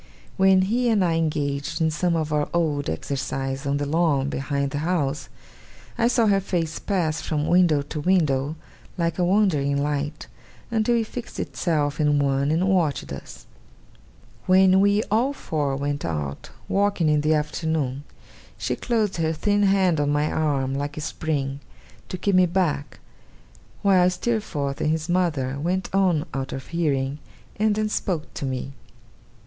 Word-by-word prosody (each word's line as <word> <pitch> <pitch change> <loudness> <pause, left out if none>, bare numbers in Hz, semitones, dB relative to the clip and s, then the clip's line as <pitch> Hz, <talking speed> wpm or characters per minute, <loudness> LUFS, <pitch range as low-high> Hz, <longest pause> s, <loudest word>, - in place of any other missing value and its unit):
When 190 -1 +5
he 240 +5 +1
and 205 -5 +3
I 170 - +1
engaged 145 -3 -1
in 160 -1 +2
some 170 +2 0
of 155 -2 -1
our 150 -1 0
old 150 -4 0
exercises 135 - -3
on 140 +1 +1
the 145 - -1
lawn 145 -3 +1
behind 140 0 -2
the 145 - -2
house, 155 -3 -1 0.7
I 235 -1 +2
saw 240 -1 +3
her 200 -2 +4
face 170 -5 -2
pass 170 -6 -1
from 150 -2 -1
window 170 -5 +3
to 150 +2 -6
window, 150 -5 +1 0.4
like 170 0 -1
a - - +3
wandering 175 -8 +2
light, 145 +1 -2 0.5
until 225 +1 +2
it 230 -1 +1
fixed 240 +2 -7
itself 150 -4 -1
in 150 -1 +3
one, 140 0 +1
and 165 +5 +1
watched 175 -7 0
us. - - -10 1.0
When 190 0 +6
we 205 +2 +3
all 245 +6 +2
four 145 - -2
went 145 +1 -2
out 75 -4 -4 0.2
walking 200 -4 +1
in 150 -1 +3
the 155 +1 +2
afternoon, 150 -3 -2 0.5
she - - -2
closed 220 -6 -1
her 160 -1 0
thin 205 +6 +1
hand 190 -5 +3
on 145 0 +1
my 145 +1 +1
arm 140 -4 0
like 145 +2 -3
a - - -3
spring, 140 -3 -2 0.5
to 185 - -4
keep 200 +2 0
me 185 -1 +5
back, 165 -5 -1 0.8
while 185 -3 +5
Steerforth 180 -9 -2
and - - +1
his 160 0 -1
mother 155 -7 0
went 180 +5 -2
on 180 -5 +2
out 135 -1 -3
of 135 - -7
hearing: 145 -4 -1 0.4
and 210 0 +2
then 215 0 0
spoke 180 -6 -3
to - - -4
me. 130 +1 -4
155 Hz, 160 wpm, -24 LUFS, 145-185 Hz, 1.0 s, When